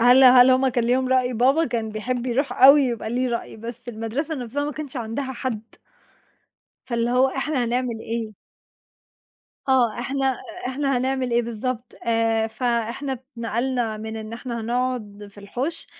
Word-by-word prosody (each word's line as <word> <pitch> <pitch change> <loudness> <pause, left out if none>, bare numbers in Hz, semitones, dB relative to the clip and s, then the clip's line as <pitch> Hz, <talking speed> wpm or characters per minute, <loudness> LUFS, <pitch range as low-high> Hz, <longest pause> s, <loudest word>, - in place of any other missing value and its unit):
هل 250 +3 +7
هل 250 0 +8
هُم 260 +1 +4
كان 245 -2 0
ليهم 255 +2 +2
رأي؟ 255 -1 +2
بابا 265 +7 +3
كان 230 -5 -2
بيحب 240 +3 -3
يروح 265 +3 0
أوي 280 +2 +9
يبقى 235 -4 -2
ليه 250 +2 0
رأي، 235 -1 -4
بس 235 +2 -8
المدرسة 240 +8 -3
نفسها 265 +1 -3
ما 295 - -3
كانش 295 -2 -7
عندها 245 +3 -3
حد. 240 -4 -3 1.2
فاللي 235 -1 0
هو 255 +2 +4
إحنا 270 -1 -1
هنعمل 240 -1 -1
إيه؟ 225 -2 -4 1.3
آه، 255 -4 +3
إحنا 265 +2 0
أ 250 - -8
إحنا 275 0 0
هنعمل 260 0 -1
إيه 240 0 +2
بالضبط؟ 235 +2 -4
آآ، 225 -1 +2
فإحنا 235 +4 -2
اتنقلنا 240 -2 -2
من 220 +1 -6
إن 220 0 -7
إحنا 235 0 -5
هنقعد 230 -3 -2
في 205 - -16
الحُوش، 250 +11 -4
245 Hz, 160 wpm, -23 LUFS, 230-260 Hz, 1.3 s, أوي